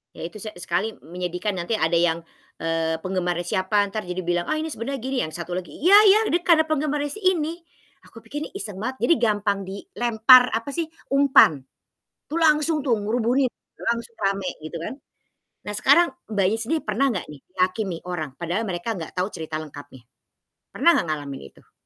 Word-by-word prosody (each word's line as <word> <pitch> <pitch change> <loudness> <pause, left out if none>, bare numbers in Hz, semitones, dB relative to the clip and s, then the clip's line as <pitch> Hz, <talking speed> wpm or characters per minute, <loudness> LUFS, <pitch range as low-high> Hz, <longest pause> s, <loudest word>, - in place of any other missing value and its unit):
Ya - - -8
itu 215 - -11
se 215 - -6
sekali 210 +5 -2
menyedihkan, 180 +4 -3
nanti 175 +6 -1
ada 170 -2 +2
yang, 170 -1 +2 0.4
eee, 165 0 0
penggemarnya 180 -2 -1
siapa 195 +2 +1
ntar 215 -4 -4
jadi 180 +1 -3
bilang, 175 0 0
"Ah 310 - 0
ini 315 0 -3
sebenernya 270 +3 -4
gini." 265 0 -2
Yang 155 +2 -5
satu 175 - -11
lagi, 185 - -6
"Ya 375 +5 +7
ya 410 +3 +7
dia 345 - +3
karena 325 -3 +5
penggemarnya 295 -2 -1
si 425 - -6
ini." 325 +2 -3 0.5
Aku 225 - -14
pikir 295 +7 -5
nih - - -12
iseng 205 - -5
banget, 255 +4 -3
jadi 330 - +5
gampang 205 -3 0
dilempar 240 - +4
apa 230 +5 -2
sih, 335 +2 -2 0.3
umpan, 275 - +5 0.7
tuh 330 +2 -3
langsung 305 0 +3
tuh 245 -5 +2
ngerubungin, 240 +5 +1
udah - - -16
langsung 235 0 -8
rame 195 -1 -1 0.2
gitu 165 +2 -6
kan. 170 - -5 0.7
Nah, 210 - -5
sekarang 315 +9 +5 0.2
Mbaknya 200 +2 +1
sendiri 310 +8 -1
pernah 220 +6 +1
nggak 180 - -4
nih 145 -2 -11 0.2
ngehakimi 185 -1 0
orang, 165 -5 -4
padahal 175 +6 -2
mereka 180 +6 -3
nggak 160 - -7
tahu 180 +2 0
cerita 160 -1 -7
lengkapnya? 145 -4 -12 0.7
Pernah 340 - +4
nggak - - 0
ngalamin 145 -3 -4
itu? - - -24
210 Hz, 185 wpm, -23 LUFS, 175-275 Hz, 0.7 s, Ya